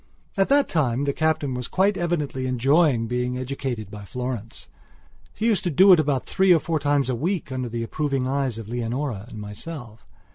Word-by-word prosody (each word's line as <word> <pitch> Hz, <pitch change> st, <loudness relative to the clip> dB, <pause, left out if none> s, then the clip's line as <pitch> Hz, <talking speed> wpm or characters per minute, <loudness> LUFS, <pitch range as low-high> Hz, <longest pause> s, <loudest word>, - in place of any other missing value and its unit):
At 195 Hz, -1 st, +2 dB
that 285 Hz, 0 st, +4 dB
time 135 Hz, -5 st, 0 dB
the 140 Hz, -1 st, 0 dB
Captain 155 Hz, -4 st, 0 dB
was 125 Hz, -1 st, -4 dB
quite 195 Hz, +2 st, +2 dB
evidently 150 Hz, -7 st, -2 dB
enjoying 130 Hz, 0 st, +3 dB
being 125 Hz, +2 st, -2 dB
educated 125 Hz, -5 st, -4 dB
by 105 Hz, -1 st, -8 dB
Florence. 120 Hz, +1 st, -5 dB, 0.7 s
She 215 Hz, -, -2 dB
used 220 Hz, -6 st, +2 dB
to -, -, +2 dB
do 185 Hz, +5 st, +7 dB
it 175 Hz, -, +5 dB
about 140 Hz, -4 st, 0 dB
three 190 Hz, -1 st, +3 dB
or 170 Hz, -, +6 dB
four 160 Hz, 0 st, -1 dB
times 145 Hz, -1 st, +1 dB
a 130 Hz, -, 0 dB
week 160 Hz, +3 st, -2 dB
under 130 Hz, -2 st, -3 dB
the 115 Hz, 0 st, -3 dB
approving 135 Hz, +1 st, -1 dB
eyes 135 Hz, -3 st, -1 dB
of 115 Hz, -2 st, -7 dB
Leonora 120 Hz, -1 st, -3 dB
and 115 Hz, -, -10 dB
myself. 110 Hz, +2 st, -8 dB
135 Hz, 190 wpm, -24 LUFS, 120-160 Hz, 0.7 s, do